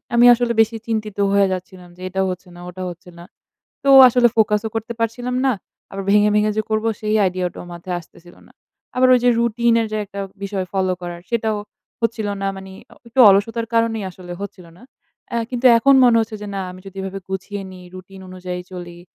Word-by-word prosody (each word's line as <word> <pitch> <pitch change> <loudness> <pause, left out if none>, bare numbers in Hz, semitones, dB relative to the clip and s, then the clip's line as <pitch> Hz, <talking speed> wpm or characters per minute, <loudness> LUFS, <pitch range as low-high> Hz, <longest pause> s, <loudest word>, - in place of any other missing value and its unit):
আমি 240 +1 +6
আসলে 240 0 0
বেশি 225 +1 0
চিন্তিত 215 -3 -3
হয়ে 200 0 +4
যাচ্ছিলাম 180 -1 -8
যে - - -14
এটা 190 +1 -1
হচ্ছে 185 +1 -6
না, - - -12
ওটা 185 +1 -7
হচ্ছে 175 +2 -11
না। - - -10 0.6
তো 275 - +1 0.2
আসলে 245 0 +4
ফোকাসও 215 0 +2
করতে 225 +2 -3
পারছিলাম 245 +2 -2
না, 265 - +4 0.4
আবার 195 0 -5
ভেঙে, 210 +1 +5
ভেঙে 210 0 +2
যে - - +3
করব 215 0 0
সেই 215 0 -1
আইডিয়াটাও 180 -1 -3
মাথায় 175 +1 -5
আসতেছিল 175 +1 -17
না। - - -21 0.4
আবার 255 0 +4
ওই 250 - +5
যে 245 - +5
রুটিন 235 0 +2
এর - - -1
যে 215 - -1
একটা 200 0 -9 0.2
বিষয় 195 -1 -3
ফলো 190 -1 0
করা, 175 -1 -5
সেটাও 220 -2 0 0.4
হচ্ছিল 230 -2 -1
না। 195 - 0
মানে 190 0 -10 0.2
আ - - -14
একটু 240 +3 -4
অলসতার 225 +4 +1
কারণেই 230 -2 +1
আসলে 180 -1 -11
হচ্ছিল 200 -3 -8
না। - - -19 0.5
অ্যা 235 - -1
কিন্তু 250 0 -4
এখন 275 +4 +4
মনে 240 -2 +5
হচ্ছে 225 0 -2
যে 210 - -6
না 195 - -2
আমি 185 - -12
যদি 195 0 -11
এভাবে 195 0 -5
গুছিয়ে 195 +1 -5
নিই, 180 -1 -12
রুটিন 185 +1 -11
অনুযায়ী 180 -1 -6
চলি, 175 -1 -9
205 Hz, 205 wpm, -20 LUFS, 185-230 Hz, 0.6 s, আমি